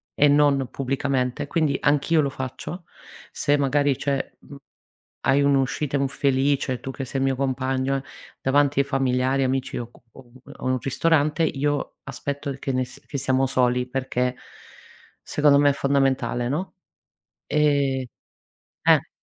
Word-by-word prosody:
e 145 - +5
non 140 -3 +3
pubblicamente. 135 -1 -1
Quindi 155 -2 +1
anch'io 150 +2 +3
lo 140 - 0
faccio 135 +7 -6 0.5
se 145 0 +1
magari 140 -1 +2
c'è 140 -1 -2
mhmm, 145 - -13 0.7
hai 135 +1 +4
un'uscita 140 +1 +1
infelice, 135 -1 0
tu 135 - -6
che 135 - -6
sei 135 +2 -3
il - - +2
mio 135 - +1
compagno, 130 0 -1
eh, 135 - -6 0.4
davanti 140 +1 +2
ai 140 - +3
familiari, 130 0 +1
amici 130 0 -1
o 120 -1 -5
co - - -22
o 135 - -14
un 130 +3 -15
o - - -8
un 130 0 +1
ristorante, 155 +4 +1
io 145 -1 -1
aspetto 140 0 -4
che 135 - -3
nes 130 0 -3
che 140 - -5
siamo 130 0 +1
soli 125 -1 +1
perché 125 -1 -1 0.9
secondo 145 -1 +3
me 145 - +5
è - - -2
fondamentale, 135 -3 +1
no, 175 +8 -3 0.7
ehm 140 -3 +2 0.8
eh. - - +4
135 Hz, 145 wpm, -24 LUFS, 130-145 Hz, 0.9 s, e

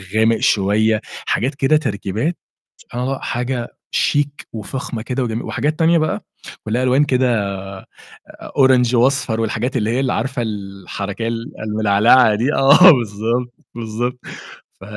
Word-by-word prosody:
غامق 110 +1 +3
شوية 110 +2 +2 0.2
حاجات 135 +5 -1
كده 140 +3 +3
تركيبات، 115 - -2 0.4
سبحان 120 - -7
الله 135 +1 -2
حاجة 120 0 -3 0.2
شيك 145 0 0
وفخمة 115 +1 -5
كده 125 +3 -2
وجمي 115 -1 -3
وحاجات 150 +6 -2
تانية 165 +1 +4
بقى 155 -1 -1 0.4
ولها 120 +4 -1
ألوان 130 +3 +3
كده 125 -6 +1 1.1
orange 130 -3 +4
وأصفر 125 -2 +1
والحاجات 115 +4 -2
اللي 110 -2 -1
هي 120 +3 0
ال 135 -2 0
عارفة 135 -2 -2
الحركية 100 0 -5
ال 115 +4 -5
الملعلعة 105 +2 +4
دي، 125 +8 0
آه 140 +7 +7
بالضبط، 120 0 -1 0.2
بالضبط 120 +2 -4 0.6
ف - - -13
120 Hz, 130 wpm, -19 LUFS, 110-135 Hz, 1.1 s, آه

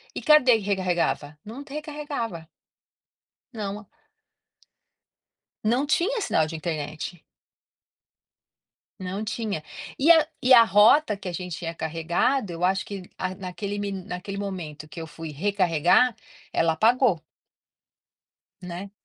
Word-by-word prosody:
E - - -4
cadê 300 -6 +6
que - - -6
recarregava? 180 -6 -1
Não 235 +7 -8
t 285 0 -12
recarregava. 290 - -5 1.1
Não. 210 -1 -5 1.8
Não 240 +6 +2
tinha 360 +11 +1
sinal 160 - +2
de 160 - -6
internet. 155 +1 -5 1.8
Não 190 +3 -4
tinha. 215 -7 -3 0.3
E 305 +5 +6
a 320 -2 +6 0.2
e 255 +1 +6
a 235 - +10
rota 215 +4 +5
que 195 -2 -7
a - - -4
gente 180 -1 -5
tinha 165 -1 -4
carregado, 170 - 0
eu 170 +1 -1
acho 190 +1 +1
que, 195 -3 -8
ah, 185 0 -2
naquele 195 +2 -5
mi 200 -1 -3
naquele 190 +1 -6
momento 165 -7 -6
que 170 - -9
eu 160 - -7
fui 160 0 -8
recarregar, 185 - +3 0.4
ela 165 -1 +2
apagou. 225 - +3 1.4
Né. 180 +2 -7
195 Hz, 125 wpm, -25 LUFS, 170-230 Hz, 1.8 s, a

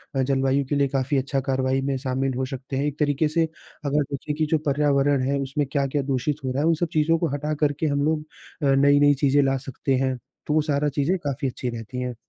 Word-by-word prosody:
अ, 135 - +2
जलवायु 135 +1 +1
के 145 - +1
लिए 140 -1 +3
काफ़ी 135 +1 0
अच्छा 135 +1 0
कार्रवाई 130 0 +1
में 135 0 -1
शामिल 130 0 -1
हो 130 - 0
सकते 135 +1 -5
हैं। 140 - 0
एक 150 0 -3
तरीके 150 +1 +2
से 165 +2 +1 0.4
अगर 145 +1 +2
देखें 140 +2 -3
कि 155 +1 +1
जो 160 - +4
पर्यावरण 140 -1 +2
है 140 - +1
उसमें 140 +2 -1
क्या-क्या 140 0 0
दूषित 135 +1 -1
हो 130 - -1
रहा 135 +2 -1
है 155 - +2
वो 165 - +5
सब 170 +2 -1
चीज़ों 160 +1 +3
को 170 - +1
हटा 150 +2 -2
करके 145 +1 +1
हम 140 -1 0
लोग 155 0 0 0.4
अ, - - +2
नई-नई 145 +1 +5
चीज़ें 140 +1 +5
ला 135 0 +1
सकते 135 +1 -1
हैं। 130 0 0 0.3
तो 150 - +1
वो 155 - +4
सारा 150 -1 0
चीज़ें 170 +7 +2
काफ़ी 140 -4 -3
अच्छी 125 0 -4
रहती 120 +1 -6
हैं। 125 -1 -3
140 Hz, 240 wpm, -24 LUFS, 135-150 Hz, 0.4 s, वो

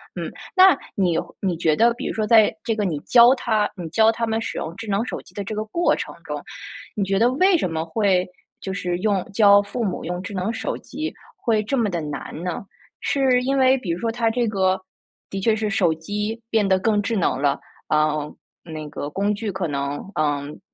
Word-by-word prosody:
嗯， - - -4 0.2
那 375 -2 +8 0.2
你 180 -4 +2 0.2
你 185 -3 -1
觉 160 -2 +2
得 235 +6 +4
比 - - -5
如 - - -2
说 215 - 0
在 220 -1 +5
这 225 - 0
个 215 - -1
你 170 -6 -1
教 240 +1 +6
他， 220 -5 0
你 175 -4 -6
教 220 +6 +4
他 230 +1 -2
们 225 0 -1
使 - - -4
用 165 +1 -4
智 225 +3 -8
能 200 +3 +1
手 - - -5
机 - - -20
的 200 - -3
这 210 - -5
个 215 0 -2
过 340 +11 +1
程 - - -6
中， - - -5 0.5
你 210 - 0
觉 195 0 0
得 240 +3 +4
为 370 +7 +4
什 315 - 0
么 160 0 -2
会， 185 0 +1 0.3
就 190 - -5
是 180 -2 -2
用 200 -2 +1
教 205 -1 +6
父 205 +4 -4
母 190 -5 -2
用 175 +1 -3
智 195 - -7
能 190 +3 -1
手 225 - -3
机 310 +4 -5 0.2
会 225 -3 +1
这 245 +6 -2
么 230 -4 +2
地 170 -2 -2
难 150 +2 -6
呢？ 180 +2 -4 0.3
是 260 -3 +2
因 270 +2 +1
为 260 0 +5
比 200 -9 -4
如 170 - -2
说 230 +2 -1
他 230 -1 +1
这 240 0 0
个， 190 -3 +1 0.5
的 195 - -4
确 220 +3 +2
是 215 -1 -1
手 180 -6 +2
机 210 +7 -4
变 220 -3 +2
得 190 -1 +3
更 210 +1 +2
智 225 - -1
能 165 -9 +1
了， 140 0 +1 0.3
啊， 155 0 +3 0.5
那 155 -2 -7
个 145 0 -5
工 200 +5 0
具 205 0 -3
可 190 -2 -2
能， 140 +5 -4
嗯， 145 -1 -1
205 Hz, 240 characters per minute, -22 LUFS, 175-225 Hz, 0.5 s, 那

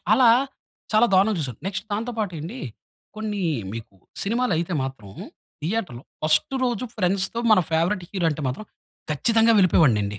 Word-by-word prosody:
అలా 255 -3 +6 0.6
చాలా 215 +3 +5
దారుణంగా 195 +1 +3
చూసాను. 125 -6 -4
నెక్స్ట్ 195 +2 -3
దాంతో 230 +4 -2
పాటు 205 -4 -1
ఎండి. 180 - -7 0.6
కొన్ని 210 -2 -3 0.3
మీకు 110 -3 -8 0.3
సినిమాలు 235 +2 0
అయితే 170 +2 -2
మాత్రం. 130 -7 -7 0.5
థియేటర్‌లో 170 - -3 0.2
ఫస్స్టు 155 +11 +2
రోజు 245 -1 -1
ఫ్రెండ్స్‌తో 195 +3 0
మన 215 - +7
ఫేవరైట్ 175 +4 +1
హీరో 185 -4 0
అంటే 150 +1 -4
మాత్రం 135 +12 -5 0.5
ఖచ్చితంగా 225 +8 +4
వెళ్ళిపోయేవాడిని 155 - +4
అండి. 105 +1 -5
190 Hz, 145 wpm, -24 LUFS, 155-220 Hz, 0.6 s, మన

